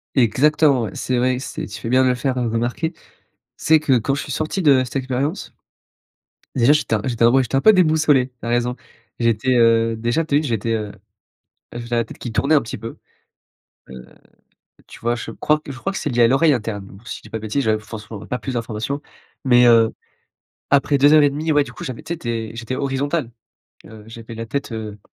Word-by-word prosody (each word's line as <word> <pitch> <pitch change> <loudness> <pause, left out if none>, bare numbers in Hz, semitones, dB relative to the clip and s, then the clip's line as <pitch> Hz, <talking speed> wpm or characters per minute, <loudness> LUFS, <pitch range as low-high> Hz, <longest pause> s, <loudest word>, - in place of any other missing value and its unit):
Exactement, 135 +3 +3
ouais. 105 - -4
C'est 130 - -1
vrai 125 +1 +1
que 130 - -6
c'est - - -6
tu 110 +1 -8
fais 115 - -5
bien 130 +2 +4
le 125 -1 +2
faire, 130 +1 -2
heu, 120 - 0
remarquer. 120 +8 -2
Tu - - -28 0.6
sais 160 0 +3
que 135 -5 +3
quand 135 +4 -1
je 145 - -3
suis - - -9
sorti 155 +7 -2
de 140 -5 +5
cette 125 - -8
expérience. 135 +6 -3 1.0
Déjà, 125 +3 +4
j'étais 150 -6 +1
un 110 - +1
j'était 120 -2 0
vraiment 130 +3 +5
j'étais 130 +2 -2
un - - +3
peu 220 - +7
déboussolé, 155 -8 +3
tu 125 - -37
as - - -2
raison. 120 +1 0 0.4
J'étais, 115 +2 +1
heu 115 -1 +3
déjà 120 +8 0
tu 145 -2 0
as - - +6
vu, 155 - -2
j'étais, 115 -4 -2
heu 105 -2 -3 0.8
j'avais 120 0 -7
la 115 - +2
tête - - -12
qui 120 - -7
tournait 140 +9 +2
un 145 - +4
petit 115 - -6
peu, 115 +2 -8 0.9
heu, 65 -1 -10 0.8
tu - - -13
vois? 120 +1 +1
Je 120 - -7
crois 150 0 0
que 145 - -9
je 130 - -9
crois 195 - -3
que 195 - -4
c'est - - -3
lié 120 -2 +3
à - - +6
l'oreille 145 +5 +4
interne, 105 -5 -4
alors 100 +5 -15
si - - -5
je - - -23
dis - - -14
pas 115 - -4
de 110 - -11
bêtises, 110 +6 -1
j'avais 110 -2 +2
forcément 110 -1 -9
p - - -10
pas 125 +3 -4
plus 130 - -5
d'informations. 115 +4 -3 0.4
Mais, 125 -2 +5
heu, 115 -1 +5 0.8
après 140 0 +3
2 145 +2 +5
heures 155 - +7
et 145 - +4
1/2 155 +3 -2
ouais, 145 -1 +4
du - - -11
coup, - - -9
j'avais 130 -8 -6
tu 165 - -5
sais, - - -6
tu 125 -7 -6
es 115 -1 -4
j'étais 120 +2 -5
horizontal. 140 0 -1 0.6
Heu, 110 -1 -13
j'avais 115 +1 -10
la 115 +1 -5
tête, 140 +3 -4
heu, 110 -2 -6
125 Hz, 240 wpm, -20 LUFS, 115-140 Hz, 1.0 s, peu